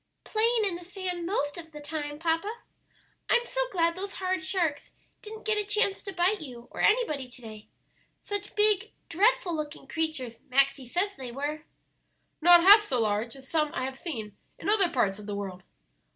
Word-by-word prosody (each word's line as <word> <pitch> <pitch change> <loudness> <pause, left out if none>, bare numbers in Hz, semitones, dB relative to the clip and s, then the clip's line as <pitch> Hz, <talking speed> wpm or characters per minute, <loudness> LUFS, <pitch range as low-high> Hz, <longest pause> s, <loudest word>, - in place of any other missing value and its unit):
"Playing 450 0 +2
in 365 -4 -1
the 350 - -11
sand 360 -1 -4
most 290 -5 -1
of 325 -1 -11
the 300 - -9
time, 295 0 -5
papa. 330 +5 0 0.8
I'm 480 0 +4
so - - -1
glad 335 -2 +2
those 390 +2 -5
horrid 370 -3 -1
sharks 315 -4 -1 0.3
didn't 435 0 -10
get 430 -1 +2
a - - 0
chance 410 -1 +1
to 390 - -6
bite 380 +2 +1
you 245 -5 -9
or - - -5
anybody 360 - +2
to 245 - -14
day. 215 -3 -11 0.5
Such 410 0 -5
big, 420 -2 +3 0.2
dreadful 375 -1 +2
looking 300 -2 -5
creatures 280 -7 -3
Maxie 275 0 +2
says 375 - -1
they 260 -3 -7
were." 295 +4 -4 0.8
"Not 345 +1 +8
half 410 +3 +10
so 265 - -2
large 215 +2 -1
as 265 -1 -11
some 305 -1 +1
I 255 - -1
have 265 0 -5
seen 230 - -6 0.2
in - - -4
other 405 -4 +4
parts 210 -9 0
of 210 - -10
the 205 - -3
world." 190 -2 -5
325 Hz, 185 wpm, -28 LUFS, 265-395 Hz, 0.8 s, half